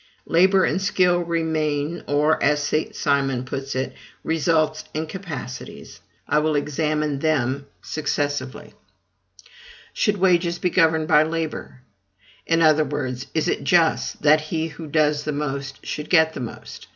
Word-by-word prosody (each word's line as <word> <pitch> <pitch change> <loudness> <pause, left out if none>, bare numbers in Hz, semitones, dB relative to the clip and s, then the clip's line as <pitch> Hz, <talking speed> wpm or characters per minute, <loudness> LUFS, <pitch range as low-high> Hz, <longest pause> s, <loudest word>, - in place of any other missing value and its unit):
LABOR 190 +3 +4
and 190 - 0
SKILL 180 -2 +2
remain; 160 -2 -1
or, 150 +2 +2
as 145 +1 +2
St. 155 +2 -1
Simon 135 -3 0
puts 135 0 -5
it, 130 0 -2 0.3
RESULTS 160 -1 +1
and 155 +1 -2
CAPACITIES. 155 -9 -8 0.3
I 150 - +3
will 155 0 0
examine 150 0 -1
them 140 -3 0 0.2
successively. 145 -3 -3 1.2
Should 210 0 +1
wages 175 -2 +2
be 180 0 -1
governed 160 -3 +3
by 150 - +6
labor? 160 -5 -4 0.7
In 165 0 +3
other 155 -1 +5
words, 135 -3 -4
is 160 +1 +1
it - - -1
just 165 -4 +2
that 155 +1 +5
he 160 +1 -3
who 160 +1 -9
does 150 0 +1
the 150 - -2
most 140 -2 -4
should 150 - -5
get 160 -3 +4
the - - -6
most? 120 -3 -8
155 Hz, 140 wpm, -22 LUFS, 145-165 Hz, 1.2 s, by